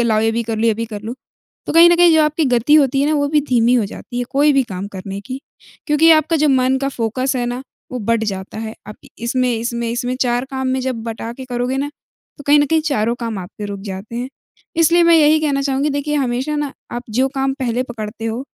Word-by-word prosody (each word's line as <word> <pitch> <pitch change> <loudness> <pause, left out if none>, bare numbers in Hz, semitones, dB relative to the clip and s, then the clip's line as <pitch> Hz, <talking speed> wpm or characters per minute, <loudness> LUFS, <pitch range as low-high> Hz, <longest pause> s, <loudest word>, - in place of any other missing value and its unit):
लाओ 220 -2 +2
ये 225 0 +2
भी 235 - -1
कर 225 -1 -3
लूँ 225 - +1
ये 225 - +3
भी 230 +1 -3
कर 210 -2 -7
लूँ। 225 +3 -5 0.5
तो - - -2
कहीं 335 +1 +8
न 345 - +4
कहीं 345 -1 +6
जो 315 - +5
आपकी 305 +1 +1
गति 250 +3 +3
होती 275 -3 +4
है 285 - +2
ना, - - +2
वो 285 -1 +1
भी 300 +1 +3
धीमी 245 -3 +2
हो 230 -4 +3
जाती 245 +4 -8
है, 245 - -1
कोई 290 +2 +3
भी 275 -1 +3
काम 195 -4 -6
करने 195 0 -7
की। 260 +1 -5 0.5
क्योंकि 310 +2 +4
आपका 315 +1 +3
जो 300 0 +2
मन 260 0 +3
का 275 +1 -1
फ़ोकस 255 +1 -1
है 245 - -1
ना, 245 +2 -4 0.3
वो 250 - -3
बँट 225 +1 0
जाता 190 +3 -7
है। 220 0 -5
आप 210 - -7
इ - - -15 0.2
इसमें 255 +1 +1
इसमें 235 0 -3
इसमें 245 +1 -2
4 245 0 +1
काम 265 -1 -3
में 260 0 0
जब 255 -3 -3
बँटा 230 0 -5
के 260 +2 -9
करोगे 250 +1 -2
ना, 280 +1 -1 0.5
तो 285 - -11
कहीं 290 +1 +6
न 290 - +2
कहीं 320 +2 +2
चारों 235 -7 0
काम 230 -3 -3
आपके 185 +3 -8
रुक 200 -1 -6
जाते 195 +3 -7
हैं। 245 +2 -3 0.5
इसलिए 335 +1 +4
मैं 335 0 +6
यही 310 0 +5
कहना 280 -3 0
चाहूँगी, 275 +2 0
देखिए 285 +1 -2
हमेशा 265 +2 -1
ना, 290 -2 -2 0.2
आप 240 - -4
जो 255 +5 +1
काम 270 0 0
पहले 245 0 0
पकड़ते 225 -2 -7
हो 230 +4 -3
255 Hz, 255 wpm, -18 LUFS, 230-285 Hz, 0.5 s, कहीं